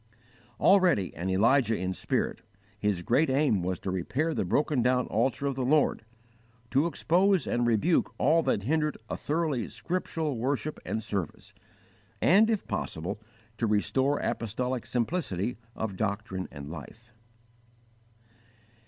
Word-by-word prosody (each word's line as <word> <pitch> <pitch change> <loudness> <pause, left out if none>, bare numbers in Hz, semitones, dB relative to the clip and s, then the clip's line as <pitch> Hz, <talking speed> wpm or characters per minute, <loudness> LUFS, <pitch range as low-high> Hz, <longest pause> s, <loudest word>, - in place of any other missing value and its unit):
_ - - -31 0.4
Already 180 - +4
an 90 +3 -3
Elijah 115 +4 +3
in 95 0 -2
spirit, - - -2 0.4
his 100 -4 0
great 135 - +2
aim 130 -7 +2
was 90 +1 -2
to 95 - -4
repair 130 - -1
the - - 0
broken 145 -3 +1
down 125 +1 +2
altar 120 +5 0
of 140 - +1
the 130 0 -2
Lord, 145 -2 +2 0.7
to 140 +5 +3
expose 185 +3 +2
and 120 0 0
rebuke 120 - +2
all 160 +5 +4
that 130 -9 0
hindered 150 +4 0
a - - -1
thoroughly 150 -6 -1
scriptural 160 -6 -3
worship 140 +5 -2
and 110 - -2
service, 100 -6 -4 0.7
and, 210 +6 +5
if 220 -3 0
possible, 90 +7 -3 0.4
to 115 - +1
restore 130 +7 +1
apostolic 125 +3 -2
simplicity 120 - -1 0.2
of 100 -4 -4
doctrine 100 -2 -2
and 70 0 -8
life. 110 +9 -11
125 Hz, 135 wpm, -28 LUFS, 100-150 Hz, 0.7 s, and